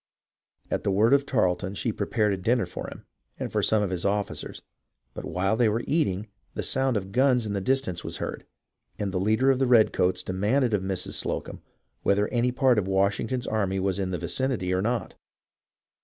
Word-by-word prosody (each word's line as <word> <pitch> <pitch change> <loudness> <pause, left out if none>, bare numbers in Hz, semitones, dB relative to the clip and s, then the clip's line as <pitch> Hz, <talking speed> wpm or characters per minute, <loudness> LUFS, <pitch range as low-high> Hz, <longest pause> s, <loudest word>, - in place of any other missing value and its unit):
At - - -1
the - - 0
word 105 +6 +4
of 140 0 +3
Tarleton 95 -4 0
she 115 - -1
prepared 105 0 0
a - - -2
dinner 115 +3 +1
for 90 - -7
him - - -10 0.3
and - - -4
for - - +1
some 110 -1 +2
of 95 - -2
his 90 -2 -2
officers, 100 0 -2 0.5
but - - -7
while 95 +3 0
they 115 -1 +3
were 115 +3 -1
eating, 110 - 0 0.3
the - - -2
sound 130 -3 +1
of 95 -1 -5
guns 125 0 +3
in 105 - -3
the 100 - -1
distance 110 -6 0
was - - -4
heard, - - -5 0.5
and 100 -2 -2
the 90 - -1
leader 110 +7 +3
of 130 - 0
the 135 - +2
redcoats 95 -6 +3
demanded 110 +7 +1
of 100 - +2
Mrs. 95 -1 -3
Slocumb - - -4 0.4
whether 100 +1 +2
any 125 0 +1
part 125 -3 +3
of 95 - -3
Washington's 100 +6 0
army 95 -3 0
was 95 0 -1
in 95 -1 -1
the 90 - -2
vicinity 120 -9 -1
or 95 - +1
not. 115 -1 -1
105 Hz, 200 wpm, -26 LUFS, 95-125 Hz, 0.5 s, word